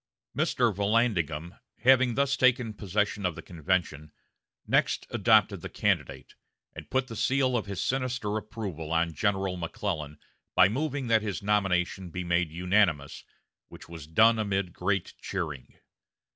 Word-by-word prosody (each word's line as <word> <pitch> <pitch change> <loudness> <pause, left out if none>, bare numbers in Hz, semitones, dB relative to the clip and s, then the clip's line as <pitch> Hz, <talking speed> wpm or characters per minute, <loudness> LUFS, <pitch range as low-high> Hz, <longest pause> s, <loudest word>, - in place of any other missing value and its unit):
Mr. 120 -3 +1
Vallandigham, 100 -5 0 0.2
having 130 -1 +5
thus 140 0 +2
taken 125 -3 +2
possession 105 +1 -1
of 90 -3 -1
the - - -8
convention, 80 -3 -2 0.5
next - - +1
adopted - - +3
the - - -6
candidate, - - -2 0.4
and - - -10
put 130 0 +1
the 115 - -9
seal 130 +2 +1
of 110 -3 -1
his 100 -2 -3
sinister 125 -5 -1
approval 100 -7 -5
on 85 0 +1
General 95 +1 -1
McClellan 75 -3 -4 0.4
by - - +7
moving 140 +4 -2
that 115 -2 +3
his 100 -3 -4
nomination 95 -3 0
be 90 +2 -5
made 85 -1 +1
unanimous, 90 -3 0 0.4
which - - -13
was 80 -3 -10
done 110 +8 +4
amid 100 -4 -1
great 95 0 -1
cheering. 80 -9 -5
100 Hz, 140 wpm, -28 LUFS, 85-115 Hz, 0.5 s, by